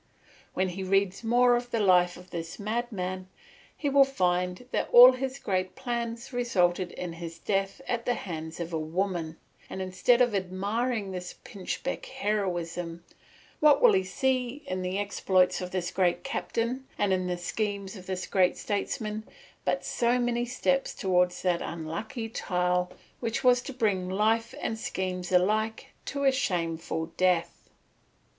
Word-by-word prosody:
When 185 Hz, 0 st, +1 dB
he 185 Hz, +2 st, -5 dB
reads 195 Hz, +2 st, +1 dB
more 245 Hz, +2 st, +4 dB
of 240 Hz, 0 st, -2 dB
the 230 Hz, -, -1 dB
life 180 Hz, -3 st, +4 dB
of 180 Hz, +1 st, -14 dB
this 165 Hz, -1 st, -5 dB
madman, 200 Hz, -4 st, -3 dB, 0.5 s
he 295 Hz, -, -2 dB
will 280 Hz, 0 st, +6 dB
find 180 Hz, -4 st, 0 dB
that -, -, -1 dB
all 245 Hz, +1 st, +11 dB
his 260 Hz, +1 st, -3 dB
great 185 Hz, -6 st, -2 dB
plans 235 Hz, 0 st, -4 dB
resulted 185 Hz, -7 st, +1 dB
in 175 Hz, -2 st, -5 dB
his 165 Hz, 0 st, -7 dB
death 195 Hz, +3 st, -1 dB
at 235 Hz, -1 st, -2 dB
the 245 Hz, -, +2 dB
hands 160 Hz, -3 st, -6 dB
of 170 Hz, 0 st, -4 dB
a 160 Hz, -, 0 dB
woman, 165 Hz, 0 st, -2 dB, 0.3 s
and -, -, -6 dB
instead 185 Hz, +6 st, +2 dB
of 245 Hz, -3 st, +3 dB
admiring 200 Hz, +3 st, -1 dB
this 180 Hz, -1 st, -6 dB
pinchbeck 200 Hz, +7 st, -4 dB
heroism, 175 Hz, -8 st, -2 dB, 0.6 s
what 295 Hz, -2 st, +6 dB
will -, -, +6 dB
he 190 Hz, -1 st, +3 dB
see 255 Hz, +6 st, -1 dB
in 185 Hz, 0 st, -3 dB
the 185 Hz, +1 st, -2 dB
exploits 190 Hz, -2 st, +2 dB
of 180 Hz, -, -4 dB
this 180 Hz, -1 st, -2 dB
great 180 Hz, -2 st, +1 dB
captain 260 Hz, -1 st, -2 dB
and 185 Hz, -3 st, +1 dB
the 180 Hz, -, -1 dB
schemes 200 Hz, +2 st, -3 dB
of 185 Hz, -2 st, -11 dB
this 185 Hz, -1 st, -3 dB
great 185 Hz, -2 st, +2 dB
statesman 210 Hz, +1 st, -3 dB, 0.4 s
but -, -, 0 dB
so 240 Hz, +1 st, +1 dB
many 240 Hz, -1 st, 0 dB
steps 270 Hz, +2 st, 0 dB
towards 180 Hz, -2 st, +1 dB
that 180 Hz, -2 st, +1 dB
unlucky 170 Hz, -, -4 dB
tile 180 Hz, -4 st, 0 dB, 0.3 s
which 230 Hz, +2 st, -2 dB
was 250 Hz, -1 st, +5 dB
to 270 Hz, -, -7 dB
bring 205 Hz, -8 st, 0 dB
life 220 Hz, +4 st, +1 dB
and 225 Hz, -, -2 dB
schemes 185 Hz, -3 st, -3 dB
alike 215 Hz, +5 st, +1 dB
to 280 Hz, 0 st, -3 dB
a 270 Hz, -, +5 dB
shameful 165 Hz, -9 st, -2 dB
death? 180 Hz, -2 st, +1 dB
195 Hz, 155 wpm, -28 LUFS, 180-235 Hz, 0.6 s, all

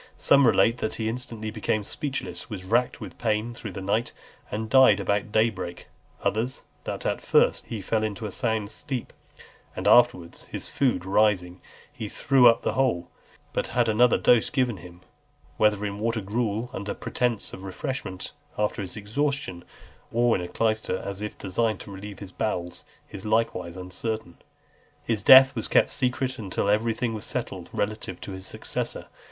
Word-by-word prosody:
Some 140 Hz, -2 st, +5 dB
relate 115 Hz, +1 st, +4 dB
that 110 Hz, -, -2 dB
he 110 Hz, -, -2 dB
instantly 110 Hz, -2 st, -4 dB
became 110 Hz, -1 st, -1 dB
speechless, 100 Hz, -, -4 dB
was 95 Hz, -4 st, -6 dB
racked 120 Hz, +5 st, +1 dB
with -, -, -9 dB
pain 110 Hz, +1 st, 0 dB
through 110 Hz, -4 st, -7 dB
the 95 Hz, -, -6 dB
night, 110 Hz, +4 st, 0 dB, 0.4 s
and 110 Hz, +1 st, -3 dB
died 130 Hz, -4 st, +6 dB
about 100 Hz, +1 st, -1 dB
day 110 Hz, +2 st, +3 dB
break; 90 Hz, -3 st, -7 dB, 0.3 s
others, 115 Hz, +5 st, -1 dB, 0.2 s
that -, -, -4 dB
at -, -, 0 dB
first -, -, +3 dB
he 110 Hz, -4 st, -5 dB
fell 110 Hz, +3 st, 0 dB
into 110 Hz, 0 st, -3 dB
a 105 Hz, -, -4 dB
sound 110 Hz, -3 st, -1 dB
sleep, 130 Hz, -4 st, -5 dB, 0.6 s
and -, -, -2 dB
afterwards, 120 Hz, -9 st, +4 dB
his -, -, -6 dB
food 130 Hz, -9 st, 0 dB
rising, 95 Hz, -3 st, +2 dB, 0.3 s
he 110 Hz, -, -6 dB
threw 135 Hz, +1 st, +5 dB
up 115 Hz, -, +5 dB
the -, -, 0 dB
whole; 125 Hz, -10 st, 0 dB, 0.4 s
but -, -, -1 dB
had 120 Hz, -1 st, +4 dB
another 115 Hz, +2 st, +4 dB
dose 120 Hz, -3 st, +4 dB
given 125 Hz, -5 st, 0 dB
him; 85 Hz, +1 st, -13 dB, 0.6 s
whether 105 Hz, -1 st, +3 dB
in 100 Hz, 0 st, -4 dB
water 115 Hz, +1 st, 0 dB
gruel, 110 Hz, +3 st, -2 dB
under 100 Hz, -2 st, -4 dB
pretence 120 Hz, -4 st, -2 dB
of -, -, -8 dB
refreshment 95 Hz, 0 st, -5 dB, 0.3 s
after 105 Hz, 0 st, 0 dB
his 95 Hz, -1 st, -6 dB
exhaustion, 110 Hz, -3 st, -2 dB, 0.5 s
or 120 Hz, 0 st, +3 dB
in -, -, -1 dB
a 90 Hz, -, -4 dB
clyster, 110 Hz, -2 st, 0 dB
as 100 Hz, +1 st, -6 dB
if 105 Hz, -, -5 dB
designed 105 Hz, +2 st, -1 dB
to 100 Hz, -, -10 dB
relieve 100 Hz, +1 st, -8 dB
his 100 Hz, -2 st, -9 dB
bowels, 90 Hz, -4 st, -3 dB, 0.3 s
is 100 Hz, -, -8 dB
likewise 110 Hz, -5 st, 0 dB
uncertain. 95 Hz, +2 st, -4 dB
XLV. -, -, -29 dB, 0.6 s
His 110 Hz, -3 st, -1 dB
death 130 Hz, +4 st, +9 dB
was -, -, -2 dB
kept -, -, +3 dB
secret 130 Hz, 0 st, -1 dB
until 100 Hz, -1 st, -2 dB
everything 115 Hz, +2 st, +1 dB
was 105 Hz, -2 st, -5 dB
settled -, -, -4 dB
relative 105 Hz, -3 st, -3 dB
to -, -, -7 dB
his 95 Hz, 0 st, -8 dB
successor. -, -, -4 dB
110 Hz, 170 wpm, -26 LUFS, 100-120 Hz, 0.6 s, death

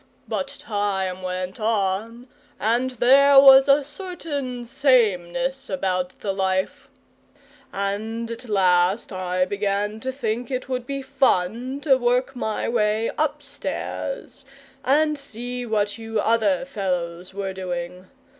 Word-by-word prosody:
But 275 Hz, -, -2 dB
time 205 Hz, -8 st, -2 dB
went 185 Hz, +1 st, -4 dB
on, 220 Hz, +2 st, -1 dB, 0.3 s
and 235 Hz, +4 st, +1 dB
there 270 Hz, +3 st, +6 dB
was 270 Hz, 0 st, +8 dB
a 280 Hz, +1 st, +5 dB
certain 290 Hz, -6 st, -5 dB
sameness 260 Hz, 0 st, +1 dB
about 185 Hz, -8 st, -2 dB
the 200 Hz, -2 st, -1 dB
life, 190 Hz, -1 st, -1 dB, 0.8 s
and 220 Hz, +4 st, -3 dB
at 230 Hz, +1 st, -8 dB
last 185 Hz, +1 st, +2 dB
I 185 Hz, 0 st, 0 dB
began 205 Hz, +2 st, -2 dB
to 260 Hz, +4 st, -3 dB
think 240 Hz, -2 st, -3 dB
it 255 Hz, -1 st, -3 dB
would 250 Hz, -2 st, -3 dB
be 275 Hz, -1 st, -4 dB
fun 260 Hz, -1 st, 0 dB
to 275 Hz, -3 st, +4 dB
work 250 Hz, +2 st, +1 dB
my 220 Hz, -3 st, -2 dB
way 220 Hz, -1 st, +1 dB
upstairs 315 Hz, -, -4 dB, 0.4 s
and 300 Hz, +2 st, +2 dB
see 245 Hz, -1 st, -6 dB
what 210 Hz, 0 st, -1 dB
you 225 Hz, -1 st, -3 dB
other 215 Hz, -1 st, +2 dB
fellows 180 Hz, -6 st, -3 dB
were 195 Hz, -1 st, -3 dB
doing. 180 Hz, -1 st, -5 dB
225 Hz, 120 wpm, -23 LUFS, 190-265 Hz, 0.8 s, was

